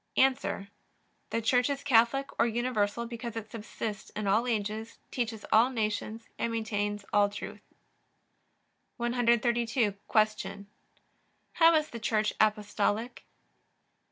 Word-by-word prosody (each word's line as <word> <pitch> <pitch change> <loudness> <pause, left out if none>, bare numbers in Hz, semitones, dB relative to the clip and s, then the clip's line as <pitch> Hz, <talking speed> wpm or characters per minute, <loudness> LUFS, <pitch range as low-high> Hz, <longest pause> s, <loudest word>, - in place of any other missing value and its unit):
A. 230 -7 +2 0.6
The 230 - -1
Church 245 +3 +3
is 280 0 -3
Catholic 270 +1 +3
or 230 - +5
universal 235 -1 0
because 235 -1 -6
it 220 -1 -6
subsists 215 -1 -5
in 215 - -5
all 215 +5 +2
ages, 220 0 -2
teaches 225 -4 -3
all 225 +4 +6
nations, 220 -1 -3
and 235 - 0
maintains 205 -2 -2
all 205 -1 +4
truth. 205 0 -8 1.4
132. 235 -1 +2 0.2
Q. 215 -2 +1 0.9
How 330 0 +6
is 310 -1 +1
the 235 - -6
Church 215 -1 +1
Apostolic? 215 +2 0
225 Hz, 115 wpm, -29 LUFS, 210-240 Hz, 1.4 s, all